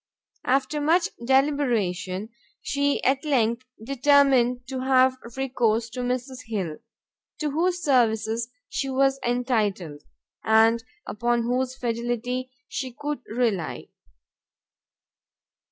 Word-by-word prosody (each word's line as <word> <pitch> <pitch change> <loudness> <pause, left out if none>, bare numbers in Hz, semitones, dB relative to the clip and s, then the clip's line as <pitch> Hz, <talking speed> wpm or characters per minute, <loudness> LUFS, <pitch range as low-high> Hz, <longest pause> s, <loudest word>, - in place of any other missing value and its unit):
After 275 +3 +1
much 335 +4 +3
deliberation, 235 -8 +1 0.3
she 285 0 0
at 270 +2 +2
length 245 -4 +1 0.2
determined 265 -2 +3
to 265 -1 -3
have 260 0 +4 0.2
recourse 235 -4 0
to 250 - -6
Mrs 250 +1 -3
Hill, 190 -8 -3 0.6
to 300 -2 -2
whose 350 +4 0
services 230 -3 +2 0.2
she 270 - -3
was 270 0 +2
entitled, 215 - -1 0.4
and 225 +1 +4 0.2
upon 235 +2 0
whose 250 +2 -1
fidelity 240 +1 -2 0.2
she 260 -1 -4
could 295 -1 -3
rely. 220 -8 -1
250 Hz, 100 wpm, -25 LUFS, 230-270 Hz, 0.6 s, have